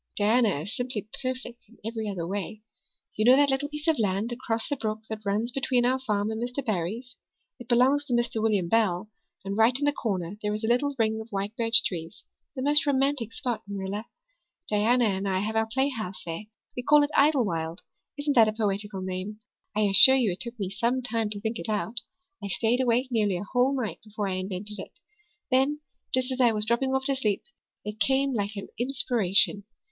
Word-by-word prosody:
Diana 215 Hz, -, +2 dB
is 200 Hz, +7 st, -6 dB
simply 245 Hz, -5 st, -4 dB
perfect 255 Hz, -2 st, -5 dB
in 235 Hz, -, -20 dB
every 225 Hz, -1 st, -3 dB
other 180 Hz, -4 st, -4 dB
way. 205 Hz, +3 st, -5 dB, 0.5 s
You 215 Hz, -, 0 dB
know 250 Hz, +3 st, +7 dB
that 285 Hz, 0 st, +4 dB
little 275 Hz, +2 st, -1 dB
piece 300 Hz, +1 st, -7 dB
of 320 Hz, -5 st, +2 dB
land 205 Hz, +2 st, 0 dB
across 230 Hz, -2 st, -2 dB
the 285 Hz, -, -1 dB
brook 215 Hz, -4 st, -4 dB
that 220 Hz, -1 st, -6 dB
runs 210 Hz, +4 st, 0 dB
up -, -, -23 dB
between 265 Hz, -3 st, +1 dB
our 260 Hz, +1 st, +2 dB
farm 210 Hz, -4 st, -1 dB
and 220 Hz, +1 st, -4 dB
Mr. 250 Hz, +3 st, -4 dB
Barry's. 220 Hz, +5 st, -3 dB, 0.4 s
It 245 Hz, -, -11 dB
belongs 255 Hz, +4 st, +3 dB
to 260 Hz, -, -3 dB
Mr. 240 Hz, -2 st, 0 dB
William 210 Hz, -5 st, +1 dB
Bell, 210 Hz, -1 st, +1 dB, 0.3 s
and 195 Hz, 0 st, -3 dB
right 225 Hz, +3 st, +4 dB
in 285 Hz, -, -1 dB
the 290 Hz, -, +3 dB
corner 195 Hz, -8 st, -3 dB
there 210 Hz, 0 st, -1 dB
is 215 Hz, -, -6 dB
a -, -, 0 dB
little 275 Hz, +4 st, +1 dB
ring 220 Hz, -1 st, 0 dB
of 220 Hz, -, -11 dB
white 200 Hz, +1 st, -4 dB
birch 230 Hz, -2 st, +7 dB
trees 165 Hz, -3 st, -5 dB, 0.3 s
the 260 Hz, -, -4 dB
most 295 Hz, +1 st, +4 dB
romantic 270 Hz, -4 st, +1 dB
spot, 245 Hz, -4 st, -3 dB
Marilla. 200 Hz, +2 st, -5 dB, 0.6 s
Diana 230 Hz, +4 st, +2 dB
and 195 Hz, -1 st, -1 dB
I 190 Hz, -1 st, 0 dB
have 210 Hz, +3 st, -2 dB
our 220 Hz, 0 st, +1 dB
playhouse 235 Hz, -7 st, -2 dB
there. 165 Hz, +5 st, -6 dB, 0.3 s
We 250 Hz, -, -3 dB
call 295 Hz, +3 st, +5 dB
it 290 Hz, -, -2 dB
Idlewild. 200 Hz, -, +1 dB, 0.4 s
Isn't 290 Hz, 0 st, 0 dB
that 225 Hz, -3 st, +7 dB
a 215 Hz, -, -1 dB
poetical 205 Hz, -2 st, -2 dB
name? 190 Hz, +3 st, -5 dB, 0.3 s
I 215 Hz, -, +1 dB
assure 205 Hz, +6 st, +9 dB
you 240 Hz, -7 st, +2 dB
it 175 Hz, -, -6 dB
took 235 Hz, -1 st, -6 dB
me 195 Hz, -2 st, -3 dB
some 235 Hz, +5 st, -1 dB
time 230 Hz, -3 st, 0 dB
to 205 Hz, -1 st, -3 dB
think 225 Hz, +2 st, -3 dB
it -, -, -4 dB
out. 220 Hz, +2 st, +1 dB, 0.4 s
I -, -, -3 dB
stayed 230 Hz, +5 st, +1 dB
awake 250 Hz, +1 st, +1 dB
nearly 210 Hz, -5 st, +1 dB
a 175 Hz, -, -5 dB
whole 255 Hz, +5 st, +1 dB
night 225 Hz, -4 st, -4 dB
before 210 Hz, -1 st, -4 dB
I 190 Hz, -, -2 dB
invented 190 Hz, +2 st, -3 dB
it. -, -, -9 dB, 0.6 s
Then, 270 Hz, +3 st, +2 dB, 0.3 s
just 255 Hz, 0 st, +1 dB
as 260 Hz, 0 st, -1 dB
I 240 Hz, -2 st, +4 dB
was 210 Hz, 0 st, 0 dB
dropping 265 Hz, +4 st, 0 dB
off 265 Hz, 0 st, -1 dB
to 275 Hz, -, +2 dB
sleep, 215 Hz, -7 st, -1 dB, 0.4 s
it 210 Hz, +1 st, -6 dB
came 270 Hz, +4 st, +2 dB
like 205 Hz, -2 st, -2 dB
an 200 Hz, -, -6 dB
inspiration. 225 Hz, -6 st, +1 dB
225 Hz, 210 wpm, -26 LUFS, 205-255 Hz, 0.6 s, assure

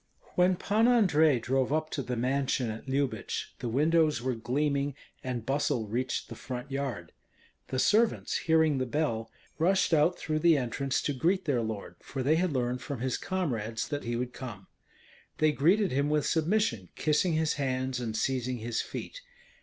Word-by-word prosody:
When 180 Hz, +1 st, +4 dB
Pan 215 Hz, +5 st, +2 dB
Andrei 160 Hz, -, +4 dB
drove 130 Hz, +3 st, 0 dB
up 155 Hz, +1 st, 0 dB
to 140 Hz, -, -2 dB
the 125 Hz, -1 st, -3 dB
mansion 130 Hz, -1 st, 0 dB
at 110 Hz, +5 st, -9 dB
Lyubich, 135 Hz, 0 st, -2 dB
the 120 Hz, -, -3 dB
windows 155 Hz, +2 st, +3 dB
were 130 Hz, +2 st, -1 dB
gleaming, 140 Hz, +4 st, -1 dB, 0.3 s
and 125 Hz, -3 st, -3 dB
bustle 135 Hz, -3 st, 0 dB
reached 125 Hz, +4 st, -2 dB
the -, -, -8 dB
front 125 Hz, +1 st, -6 dB
yard. 130 Hz, -, -3 dB, 0.6 s
The 130 Hz, -, -3 dB
servants, 220 Hz, -, +2 dB
hearing 160 Hz, -3 st, +3 dB
the 130 Hz, -, -1 dB
bell, 115 Hz, -5 st, -1 dB, 0.3 s
rushed 185 Hz, +2 st, +3 dB
out 165 Hz, +3 st, +4 dB
through 155 Hz, -1 st, -2 dB
the 165 Hz, -1 st, +5 dB
entrance 135 Hz, +1 st, -1 dB
to 145 Hz, -, 0 dB
greet 180 Hz, +8 st, +1 dB
their 135 Hz, -6 st, +1 dB
lord, 110 Hz, -3 st, -5 dB
for 135 Hz, -2 st, -5 dB
they 155 Hz, +5 st, +3 dB
had 180 Hz, 0 st, +1 dB
learned 125 Hz, -2 st, -1 dB
from 140 Hz, -5 st, -5 dB
his 130 Hz, 0 st, 0 dB
comrades 115 Hz, -, -2 dB
that 145 Hz, -1 st, -3 dB
he 120 Hz, 0 st, -2 dB
would 125 Hz, +1 st, -3 dB
come. 110 Hz, -7 st, -8 dB, 0.7 s
They 155 Hz, 0 st, +4 dB
greeted 180 Hz, +7 st, +3 dB
him 140 Hz, +2 st, +1 dB
with 150 Hz, -1 st, +1 dB
submission, 160 Hz, -, +1 dB
kissing 155 Hz, +3 st, +1 dB
his 160 Hz, 0 st, +1 dB
hands 130 Hz, -1 st, -1 dB
and 110 Hz, -3 st, -3 dB
seizing 130 Hz, 0 st, -1 dB
his 115 Hz, 0 st, -2 dB
feet. -, -, -7 dB
140 Hz, 175 wpm, -29 LUFS, 125-160 Hz, 0.7 s, the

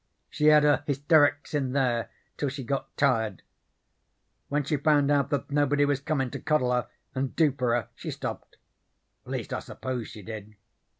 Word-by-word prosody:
She 150 Hz, -, -1 dB
had 150 Hz, -1 st, +7 dB
her 145 Hz, 0 st, +3 dB
hysterics 145 Hz, +1 st, +3 dB
in 135 Hz, -4 st, 0 dB
there 120 Hz, -4 st, +1 dB, 0.3 s
till 145 Hz, -, -1 dB
she 135 Hz, 0 st, -6 dB
got 135 Hz, +3 st, -4 dB
tired. 110 Hz, -, +1 dB, 1.1 s
When 145 Hz, +1 st, +1 dB
she 145 Hz, +2 st, 0 dB
found 145 Hz, 0 st, +3 dB
out 145 Hz, -1 st, +2 dB
that 140 Hz, -2 st, -2 dB
nobody 145 Hz, 0 st, +3 dB
was 145 Hz, -1 st, +1 dB
comin' 140 Hz, -4 st, -1 dB
to -, -, -5 dB
coddle 140 Hz, -5 st, +1 dB
her 125 Hz, -, 0 dB, 0.3 s
and 130 Hz, 0 st, -2 dB
do 155 Hz, -3 st, +4 dB
for 125 Hz, -3 st, 0 dB
her 120 Hz, -5 st, -1 dB
she -, -, -7 dB
stopped. -, -, -6 dB, 0.7 s
At -, -, -8 dB
least -, -, -4 dB
I -, -, -1 dB
suppose 125 Hz, -3 st, -5 dB
she 105 Hz, -, -10 dB
did. 110 Hz, 0 st, -8 dB
140 Hz, 180 wpm, -27 LUFS, 125-145 Hz, 1.1 s, had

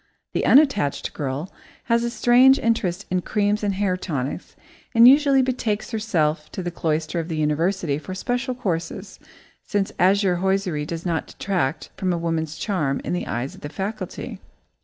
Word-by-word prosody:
The -, -, 0 dB
unattached 260 Hz, -, +3 dB
girl 145 Hz, +4 st, -4 dB, 0.3 s
has 235 Hz, 0 st, +1 dB
a 235 Hz, -, 0 dB
strange 250 Hz, +3 st, +5 dB
interest 205 Hz, -4 st, 0 dB
in 185 Hz, 0 st, +1 dB
creams 210 Hz, +2 st, 0 dB
and 200 Hz, -2 st, 0 dB
hair 195 Hz, -2 st, +1 dB
tonics, 145 Hz, -8 st, -4 dB, 0.4 s
and 230 Hz, +1 st, +9 dB
usually 275 Hz, 0 st, +6 dB
betakes 240 Hz, -5 st, -2 dB
herself 165 Hz, -9 st, -1 dB
to 185 Hz, -, -4 dB
the 175 Hz, -, -3 dB
cloister 160 Hz, 0 st, -1 dB
of 165 Hz, -, -3 dB
the 160 Hz, -2 st, -3 dB
university 155 Hz, 0 st, 0 dB
for 185 Hz, +5 st, -7 dB
special 245 Hz, +5 st, -2 dB
courses, 180 Hz, -9 st, -4 dB, 0.4 s
since 200 Hz, -1 st, -1 dB
azure 190 Hz, 0 st, +3 dB
hosiery 185 Hz, -5 st, 0 dB
does 165 Hz, +1 st, -5 dB
not 165 Hz, -2 st, -1 dB
detract 165 Hz, -6 st, -2 dB
from 180 Hz, -3 st, 0 dB
woman's 160 Hz, -2 st, -2 dB
charm 155 Hz, -10 st, -1 dB
in -, -, -3 dB
the 180 Hz, -, -2 dB
eyes 120 Hz, +4 st, -3 dB
of -, -, -14 dB
the 145 Hz, -, -6 dB
faculty. 195 Hz, +7 st, -5 dB
185 Hz, 160 wpm, -23 LUFS, 160-215 Hz, 0.4 s, and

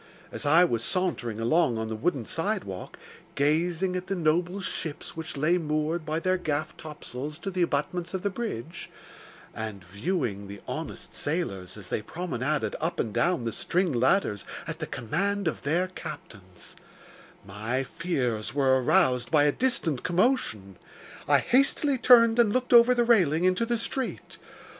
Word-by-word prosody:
As 145 Hz, -, -4 dB
I 165 Hz, +5 st, +7 dB
was 120 Hz, -10 st, 0 dB
sauntering 150 Hz, -, -1 dB
along 120 Hz, +1 st, +2 dB
on 110 Hz, 0 st, -2 dB
the 110 Hz, -, -4 dB
wooden 130 Hz, +1 st, -1 dB
sidewalk, 165 Hz, -, -3 dB, 0.4 s
gazing 170 Hz, +5 st, +1 dB
at 185 Hz, 0 st, -4 dB
the 195 Hz, -, -1 dB
noble 175 Hz, +3 st, +1 dB
ships 160 Hz, -5 st, -5 dB
which 160 Hz, -2 st, -6 dB
lay 170 Hz, +5 st, +2 dB
moored 155 Hz, +1 st, -1 dB
by 155 Hz, +1 st, 0 dB
their 185 Hz, +2 st, +1 dB
gaff 155 Hz, -2 st, -2 dB
topsails 150 Hz, -1 st, -7 dB
to 195 Hz, +3 st, -5 dB
the 185 Hz, -1 st, -2 dB
abutments 170 Hz, +3 st, -1 dB
of 190 Hz, -, -4 dB
the 200 Hz, -, 0 dB
bridge, 170 Hz, -, -5 dB, 0.6 s
and 110 Hz, -4 st, -6 dB
viewing 100 Hz, -, -3 dB
the 100 Hz, 0 st, -9 dB
honest -, -, -6 dB
sailors 105 Hz, -, -3 dB
as 95 Hz, -3 st, -10 dB
they -, -, -1 dB
promenaded 155 Hz, +1 st, -2 dB
up 165 Hz, +2 st, -2 dB
and 110 Hz, -, -1 dB
down 175 Hz, -4 st, +1 dB
the 115 Hz, -, -2 dB
string 180 Hz, -, 0 dB
ladders 125 Hz, -, +2 dB, 0.2 s
at -, -, -6 dB
the -, -, -4 dB
command 200 Hz, -, -1 dB
of 160 Hz, -, -2 dB
their 165 Hz, +6 st, +1 dB
captains, 95 Hz, -, -10 dB, 0.7 s
my 110 Hz, +7 st, -2 dB
fears 125 Hz, -8 st, -2 dB
were 130 Hz, -2 st, +3 dB
aroused 125 Hz, 0 st, +3 dB
by 150 Hz, -2 st, +4 dB
a 145 Hz, -, +4 dB
distant 175 Hz, -, 0 dB
commotion. 175 Hz, -, 0 dB, 0.5 s
I -, -, +6 dB
hastily 275 Hz, +1 st, +2 dB
turned 230 Hz, -2 st, +6 dB
and 230 Hz, -3 st, +5 dB
looked 250 Hz, +2 st, 0 dB
over 240 Hz, +1 st, +8 dB
the 240 Hz, -, +3 dB
railing 180 Hz, -9 st, +3 dB
into 185 Hz, +5 st, +2 dB
the 235 Hz, 0 st, +1 dB
street. 255 Hz, +3 st, -4 dB
160 Hz, 160 wpm, -27 LUFS, 120-185 Hz, 0.7 s, over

